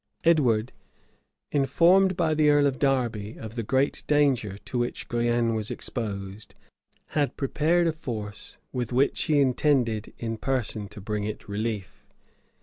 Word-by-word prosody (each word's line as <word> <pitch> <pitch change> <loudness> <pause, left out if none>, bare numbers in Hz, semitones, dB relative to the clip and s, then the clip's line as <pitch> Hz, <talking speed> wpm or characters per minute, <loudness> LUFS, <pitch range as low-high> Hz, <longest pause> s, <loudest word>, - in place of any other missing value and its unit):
Edward, 130 -9 +3 0.8
informed 170 +7 +4
by 160 -3 +2
the 155 -1 +3
earl 145 -1 +5
of 135 -2 0
Derby 120 -6 0
of 110 -1 -8
the 120 - -3
great 130 +5 0
danger 135 -9 +2
to 125 +4 -4
which 120 0 -3
Guienne 120 -1 +1
was 110 -1 -2
exposed, 100 -3 -5 0.5
had 145 -2 -1
prepared 160 +5 +2
a 165 - +1
force 110 -9 -7 0.2
with 125 -3 -2
which 130 +3 +2
he 150 -2 +3
intended 125 -5 +1
in 115 -1 -4
person 115 -5 -2
to 105 +1 -11
bring 105 +1 -3
it 105 0 -5
relief. 105 -1 -4
120 Hz, 145 wpm, -26 LUFS, 110-145 Hz, 0.8 s, earl